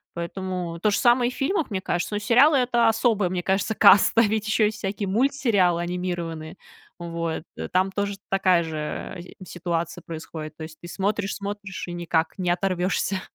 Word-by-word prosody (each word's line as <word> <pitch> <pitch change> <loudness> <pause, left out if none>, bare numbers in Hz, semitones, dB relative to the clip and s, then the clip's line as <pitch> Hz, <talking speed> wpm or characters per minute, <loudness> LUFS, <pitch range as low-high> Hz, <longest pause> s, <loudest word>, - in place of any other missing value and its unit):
Поэтому 175 -1 -4
то 210 - +2
же 200 - +1
самое 240 0 +4
и - - -8
в - - -12
фильмах, 320 +2 0
мне 190 -2 -3
кажется, 180 +3 -2
ну, - - 0
сериалы- 260 +7 +5
это 240 -2 +3
особая, 220 -4 +2
мне 180 -1 -2
кажется, 195 +3 0
каста. 215 +3 +6
Ведь 215 -1 0
еще 215 0 +3
есть 215 +1 -1
всякие 200 0 -3
мультсериалы 215 - +2
анимированные, 175 -2 -4 0.4
вот. 170 -2 -4 0.3
Там 190 +1 +2
тоже 200 0 -2
такая 185 -3 +3
же, 160 -1 -6 0.6
э, 185 - -11
ситуация 170 -1 -3
происходит, 155 -1 -8
то 160 - -7
есть 155 0 -10
ты 175 - -9
смотришь 200 +2 -2
смотришь 200 -2 -6
и 175 - -5
никак 170 0 -1
не 180 -1 0
оторвешься. 185 +1 0
190 Hz, 175 wpm, -24 LUFS, 175-215 Hz, 0.6 s, каста